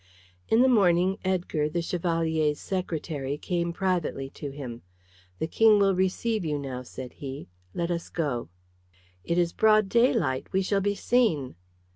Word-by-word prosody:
In 230 +3 +5
the - - +5
morning 190 -4 +3
Edgar, 175 -5 0
the 170 +2 -2
Chevalier's 165 -3 0
secretary, 155 -7 -3
came 170 +1 -2
privately 170 -7 -2
to 145 - -6
him. 130 -4 -7 0.6
"The - - -1
King 215 +6 +5
will 200 -1 +4
receive 190 +3 0
you 150 -2 -1
now," 135 -3 -5
said 125 0 -9
he. 135 -5 -8 0.3
"Let 170 0 -1
us 170 -1 -3
go." 140 - -2 0.7
"It 170 - -1
is 175 -1 +2
broad 215 -2 +4
daylight. 170 - +2
We 190 0 +1
shall 195 +1 +1
be 205 +1 0
seen." 195 - +1
170 Hz, 150 wpm, -27 LUFS, 145-195 Hz, 0.7 s, In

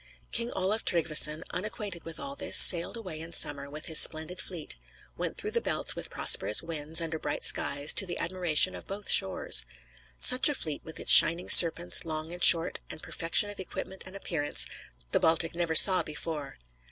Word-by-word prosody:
] - - -37
King 235 0 -4
Olaf 195 +4 -5
Tryggveson, 155 -2 -3
unacquainted 200 -2 -10
with 165 -1 -10
all 140 0 -8
this, - - 0
sailed 175 +5 +4
away 185 -9 -11
in 165 +1 -11
summer, 140 -3 -1
with 150 +2 -7
his 160 - +3
splendid 160 +3 +1
fleet; 170 -5 -11 0.4
went - - -9
through - - -8
the - - -4
Belts - - -1
with - - -8
prosperous 105 - -1
winds, 160 -1 -5
under 160 -1 -7
bright 145 - -8
skies, 140 +1 0
to 195 - -2
the 175 - -8
admiration 180 0 -1
of - - -14
both 200 +1 -10
shores. 95 - +2 0.5
Such 255 +3 +4
a 295 - -6
fleet, 155 - -7
with 160 - -12
its - - +2
shining 170 +2 +6
Serpents, 170 0 +6
long 160 0 -8
and 175 - -9
short, 165 -1 +4
and 155 - -12
perfection 170 +5 -2
of 205 - -17
equipment 190 0 -11
and 185 - -14
appearance, 160 -6 -3 0.5
the - - -2
Baltic 165 0 -1
never 170 -1 -6
saw 185 +2 +8
before. 150 -2 -10
165 Hz, 190 wpm, -24 LUFS, 155-185 Hz, 0.5 s, saw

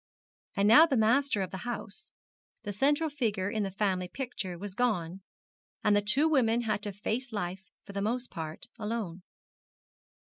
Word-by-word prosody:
And 200 0 +3
now 305 +10 +9
the 270 - +1
master 230 -1 +3
of 185 - -5
the 190 - -4
house, 240 - -6 0.5
the 205 - -4
central 290 +9 +2
figure 220 -10 -1
in 220 -2 -1
the 195 - -1
family 190 -2 0
picture, 195 -5 -5
was 200 +2 -6
gone, 195 -6 0 0.6
and 210 -1 +4
the 205 - +4
two 260 +10 +3
women 240 -6 +3
had 215 -3 -1
to 205 -1 -3
face 225 +6 -3
life 190 -2 -4 0.2
for 200 - -10
the 200 - -2
most 240 +4 -1
part 160 -3 -6
alone. 210 -5 -3
210 Hz, 170 wpm, -30 LUFS, 195-245 Hz, 0.6 s, now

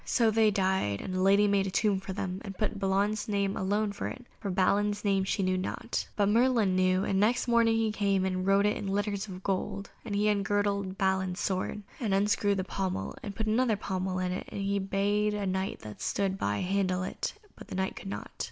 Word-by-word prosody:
So 230 -3 +2
they 220 0 +4
died; 190 - +1
and 185 - -5
the 185 - 0
lady 200 +2 +5
made 200 -1 +2
a - - -1
tomb 200 0 +2
for 195 0 -7
them, 190 0 -4
and 195 -2 -7
put 210 -1 -1
Balan's 200 +2 +1
name 200 -2 0
alone 205 +2 0
on - - 0
it, 250 - -8
for 205 - -4
Balin's 205 +3 +1
name 195 -1 +3
she 195 - 0
knew 185 0 +1
not. 185 - -3
But 205 -1 +2
Merlin 225 -4 +3
knew, 185 0 +3
and 190 -1 +1
next 230 +5 +2
morning 230 -1 +4
he 225 -1 +1
came 200 -2 +1
and 185 -1 -1
wrote 195 +1 +4
it 210 - +2
in 200 - -5
letters 200 +1 -1
of 185 -1 -8
gold, 200 +1 -2
and 210 -3 -4
he 210 +1 +2
ungirded 200 -1 0
Balin's 190 -1 0
sword, 195 +2 -2 0.2
and 215 -7 +1
unscrewed 200 0 +2
the 190 - 0
pommel, 190 0 -3
and 205 -6 -6
put 220 - -2
another 220 0 +2
pommel 185 -1 -2
on 185 0 -1
it, 185 - -5
and 195 -1 -2
bade 205 +2 +1
a 205 -1 -2
Knight 190 +1 -2
that 105 -1 -9
stood 195 -1 0
by 105 - -1
handle 185 -1 0
it, - - -4 0.2
but - - -12
the - - -6
Knight 190 0 -1
could - - -7
not. 100 +1 -6
195 Hz, 220 wpm, -29 LUFS, 190-210 Hz, 0.2 s, lady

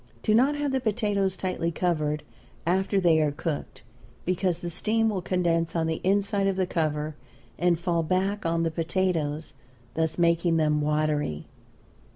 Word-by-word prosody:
Do 215 - +2
not 265 +6 +4
have 290 -1 -1
the 265 - +1
potatoes 205 -4 0
tightly 185 -3 -1
covered 155 -4 -1 0.4
after 190 +3 +2
they 165 -4 +4
are 150 -1 +2
cooked, 155 0 -5 0.4
because 180 -1 0
the 175 - -5
steam 225 +5 +1
will 195 -4 -2
condense 170 -2 0
on 165 -1 +1
the 160 0 -2
inside 200 +1 +2
of 195 - +1
the 190 -1 +1
cover 155 -3 -1 0.5
and 175 -1 +3
fall 170 0 0
back 190 +5 0
on 165 0 +1
the 165 - 0
potatoes, 165 -2 -1 0.4
thus 160 0 -1
making 170 -1 +3
them 150 -1 +2
watery. 150 - 0
170 Hz, 160 wpm, -26 LUFS, 160-195 Hz, 0.5 s, not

